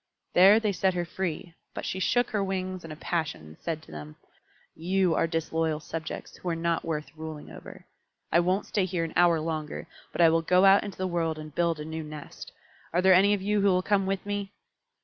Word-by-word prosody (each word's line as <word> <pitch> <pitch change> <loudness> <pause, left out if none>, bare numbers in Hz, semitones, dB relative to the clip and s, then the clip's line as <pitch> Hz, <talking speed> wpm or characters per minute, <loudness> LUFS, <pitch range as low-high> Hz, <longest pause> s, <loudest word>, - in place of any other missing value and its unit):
There 195 +4 +7
they 215 -2 0
set 190 -1 +1
her 175 -1 -1
free, 175 0 -4 0.2
but - - -5
she 190 - -3
shook 245 +6 +1
her 205 -3 0
wings 185 -1 -3
in 165 - -8
a - - -6
passion 160 - -2
and 80 0 -13
said 160 -2 -4
to - - -15
them, 75 0 -9 0.6
"You 180 +1 +1
are 165 - +2
disloyal 160 -1 -1
subjects, 160 0 -6
who 180 - -4
are 165 - 0
not 165 0 -1
worth 150 -3 -4
ruling 155 -1 -8
over. - - -11 0.5
I 170 - +5
won't 185 +3 +1
stay 200 -3 0
here 180 -2 -2
an 165 - -5
hour 175 -2 +4
longer, 155 -1 -4 0.3
but - - -8
I 165 - +8
will 165 0 +2
go 180 +3 +4
out 195 +1 +6
into 205 -2 -7
the 185 - -2
world 165 -3 -1
and 155 -1 -9
build 170 -1 0
a 150 - -5
new 160 +1 -5
nest. 150 -1 -9 0.4
Are 175 - +1
there 190 0 +7
any 200 +3 +5
of 195 - -6
you 205 +1 +1
who 200 - +3
will 185 -1 +3
come 195 -1 +1
with 195 0 -2
me?" 205 -1 -3
170 Hz, 225 wpm, -27 LUFS, 160-190 Hz, 0.6 s, I